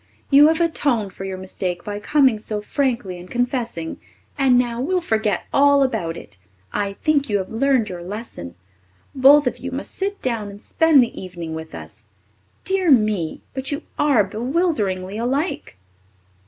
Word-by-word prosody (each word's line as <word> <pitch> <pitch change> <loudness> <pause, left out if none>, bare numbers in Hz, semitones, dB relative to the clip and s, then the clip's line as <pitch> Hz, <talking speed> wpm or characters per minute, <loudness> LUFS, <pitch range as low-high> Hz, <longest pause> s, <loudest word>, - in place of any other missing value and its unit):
You 285 +2 +8
have 320 +1 +2
atoned 280 - 0
for 195 - -7
your 190 -1 -4
mistake 185 -1 -4
by 205 0 -5
coming 265 -1 +3
so 210 0 -3
frankly 230 -6 -2
and 180 +1 -12
confessing, 240 -9 -2 0.4
and 265 -3 +4
now 240 -1 0
we'll 365 +7 +1
forget 220 - 0
all 280 0 +5
about 170 -11 -2
it. 95 -2 -12 0.3
I 200 -1 -1
think 290 -4 +2
you 205 - +2
have 190 -1 -5
learned 250 -1 +2
your 180 -3 -6
lesson. 180 - -7 0.6
Both 280 +2 +6
of 250 - -1
you 270 - -5
must 270 +3 -4
just - - -5
sit 400 +1 -2
down 230 -5 -2
and 200 0 -11
spend 315 +2 +4
the 235 - -5
evening 175 -3 -7
with 160 0 -7
us. - - -11 0.6
Dear 380 -2 +2
me, 215 - +2
but 265 +1 -4
you 285 +2 -3 0.2
are 280 -8 +4
bewilderingly 215 - -1
alike!" 265 - -2
235 Hz, 170 wpm, -21 LUFS, 195-280 Hz, 0.6 s, You